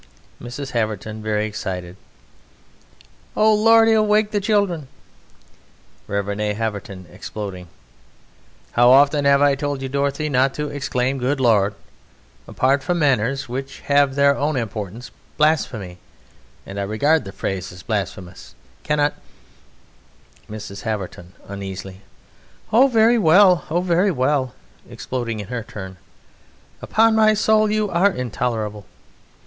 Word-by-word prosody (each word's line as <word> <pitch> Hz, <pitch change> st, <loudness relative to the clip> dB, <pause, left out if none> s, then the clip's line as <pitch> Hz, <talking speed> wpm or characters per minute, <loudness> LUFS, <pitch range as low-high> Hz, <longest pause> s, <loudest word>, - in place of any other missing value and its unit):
MRS. 130 Hz, +3 st, -7 dB
HAVERTON 110 Hz, -1 st, -3 dB
(very 105 Hz, 0 st, -1 dB
excited): 90 Hz, -4 st, -5 dB, 1.4 s
Oh, 215 Hz, 0 st, +5 dB
Lord, 225 Hz, +1 st, +5 dB
he'll 220 Hz, -1 st, +4 dB
wake 210 Hz, 0 st, +2 dB
the 205 Hz, -1 st, 0 dB
children! 200 Hz, -8 st, 0 dB, 1.2 s
REV. 100 Hz, 0 st, -3 dB
A. 105 Hz, -1 st, 0 dB
HAVERTON 100 Hz, -4 st, -5 dB
(exploding): 95 Hz, -1 st, -7 dB, 1.0 s
How 120 Hz, +1 st, +4 dB
often 140 Hz, +2 st, +5 dB
have 140 Hz, 0 st, +4 dB
I 145 Hz, -1 st, +4 dB
told 145 Hz, 0 st, -3 dB
you, -, -, -2 dB
Dorothy, 140 Hz, +2 st, -1 dB
Not 135 Hz, -1 st, +1 dB
to 150 Hz, -1 st, -3 dB
exclaim 135 Hz, -2 st, -2 dB
"Good 135 Hz, +3 st, -1 dB
Lord!"... 105 Hz, -5 st, +2 dB, 0.7 s
Apart 135 Hz, +2 st, +1 dB
from 175 Hz, +5 st, -1 dB
manners 135 Hz, -3 st, +1 dB
Which 135 Hz, +3 st, -6 dB
have 140 Hz, -1 st, +2 dB
their 140 Hz, 0 st, +4 dB
own 145 Hz, +2 st, -1 dB
importance 110 Hz, -1 st, -5 dB, 0.3 s
blasphemy 120 Hz, -, 0 dB, 0.7 s
(And 100 Hz, +1 st, -7 dB
I -, -, -1 dB
regard 140 Hz, +10 st, +1 dB
the 95 Hz, -, -8 dB
phrase 95 Hz, -2 st, -4 dB
as 90 Hz, -2 st, -12 dB
blasphemous) 90 Hz, +3 st, -5 dB, 0.3 s
Cannot 150 Hz, -1 st, +1 dB, 1.4 s
MRS. 105 Hz, -2 st, -8 dB
HAVERTON 95 Hz, -5 st, -5 dB
(uneasily): 95 Hz, -1 st, -7 dB, 0.7 s
Oh, 255 Hz, +5 st, +6 dB
very 230 Hz, -1 st, +4 dB
well!... 180 Hz, -1 st, +5 dB
Oh, 170 Hz, +3 st, +1 dB
very 180 Hz, +2 st, +2 dB
well! 130 Hz, -, 0 dB, 0.3 s
(Exploding 120 Hz, -4 st, -4 dB
in 100 Hz, -, -7 dB
her 125 Hz, -2 st, -3 dB
turn.) 95 Hz, -3 st, -9 dB, 0.8 s
Upon 225 Hz, +1 st, +3 dB
my 215 Hz, -1 st, +4 dB
soul, 215 Hz, 0 st, +3 dB
you 215 Hz, 0 st, 0 dB
are 180 Hz, +4 st, +4 dB
intolerable! 115 Hz, -, -3 dB
130 Hz, 125 wpm, -21 LUFS, 105-155 Hz, 1.4 s, Oh